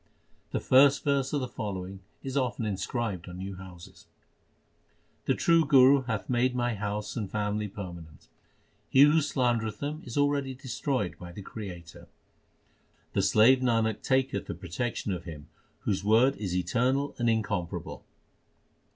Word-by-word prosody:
The - - -2
first 140 +2 +5
verse 140 -2 +1
of 145 - 0
the 130 - -2
following 95 -5 -5 0.2
is 135 0 -5
often 125 -4 0
inscribed 100 -2 -3
on 90 - -8
new 95 +1 -6
houses: 90 -2 -13 1.2
The - - +2
True 165 -1 +4
Guru 135 -2 +6
hath 110 -4 -3
made 125 0 +1
my 120 -1 0
house 105 0 -4
and 105 -6 -3
family 105 +1 -1
permanent. 85 - -9 0.6
He 135 - +5
who 150 +2 +6
slandereth 120 -6 0
them 150 +2 -4
is 120 - -7
already 145 -2 +1
destroyed 125 - -3
by 90 0 -9
the 100 +3 -9
Creator. 90 -6 -9 1.1
The 100 - +2
slave 110 +7 +5
Nanak 115 -4 +1
taketh 130 -6 0
the - - -4
protection 95 +6 -3
of 90 0 -6
Him 80 -2 -9 0.3
whose 100 -1 -1
word 115 +6 +4
is 95 -4 -3
eternal 125 - 0
and 120 -1 +2
incomparable. 100 -6 -2
110 Hz, 145 wpm, -28 LUFS, 95-130 Hz, 1.2 s, Guru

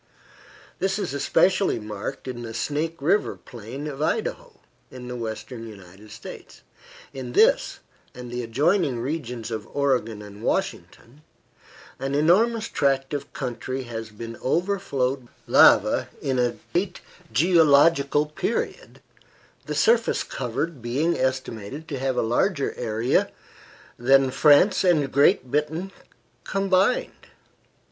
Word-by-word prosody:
This 190 +1 0
is 190 -9 -3
especially 185 +6 +2
marked 105 +5 -6
in 125 -2 -5
the 115 -1 -7
Snake 155 +6 -2
River 175 +9 +1
plain 120 +5 -9
of 145 -2 -6
Idaho, 475 - -2 0.3
in 125 -2 -10
the 125 - -5
western 115 0 -6
United 100 0 -13
States. 110 +1 -11 0.5
In 125 -2 -7
this, - - +3 0.3
and 125 -1 -8
the 125 0 -3
adjoining 140 - +1
regions 125 -4 -4
of 110 -1 -5
Oregon 125 -7 0
and 105 0 -12
Washington, 120 +3 -3 0.8
an 135 +1 -2
enormous 215 +9 +3
tract 135 0 0
of 145 - -4
country 130 0 -4
has 115 -2 -6
been 115 +2 -8
overflowed 140 -6 -1
by - - -29
lava - - +5
in 130 -2 -1
a 120 -1 +1 0.2
late 185 +1 -1 0.3
geological 150 -3 +4
period, 150 0 -4 0.7
the 150 - -3
surface 230 +9 +3
covered 135 +4 -4
being 140 +9 0
estimated 130 +2 -3
to 140 -4 -4
have 130 -1 -1
a - - +2
larger 140 - 0
area 115 +1 0 0.7
than 135 +2 +4
France 155 +9 +5
and 155 -7 +2
Great 130 -2 +3
Britain 160 +6 -1 0.5
combined. 195 - 0
135 Hz, 120 wpm, -24 LUFS, 120-165 Hz, 0.8 s, lava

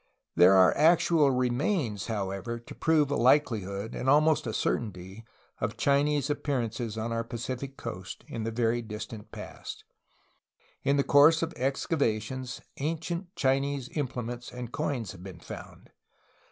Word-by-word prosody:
There 90 +3 +7
are 95 -1 +6
actual 160 -1 +4
remains, 125 - 0
however, 105 +1 -3
to 120 - -11
prove 155 -3 +2
a - - +2
likeli 125 -3 +4
hood, 100 +3 -5
and 130 - -1
almost 155 0 +4
a - - -1
certainty, 100 -1 -3 0.4
of 105 +1 -2
Chinese 140 0 +2
appearances 120 -6 -2
on 115 +1 -2
our 115 0 -1
Pacific 130 +4 -5
coast 95 -5 -7
in 115 - -5
the 115 - -1
very 115 +1 +1
distant 105 -1 -8
past. - - -8 1.0
In 140 +1 +2
the 140 - +3
course 150 +4 +6
of 165 0 -3
excavations 130 -3 -1 0.2
ancient 165 +5 -3
Chinese 135 -1 0
implements 125 -4 -4
and 125 -1 -7
coins 130 - -2
have 95 - -12
been 90 -2 -9
found. - - -10
125 Hz, 140 wpm, -29 LUFS, 110-145 Hz, 1.0 s, There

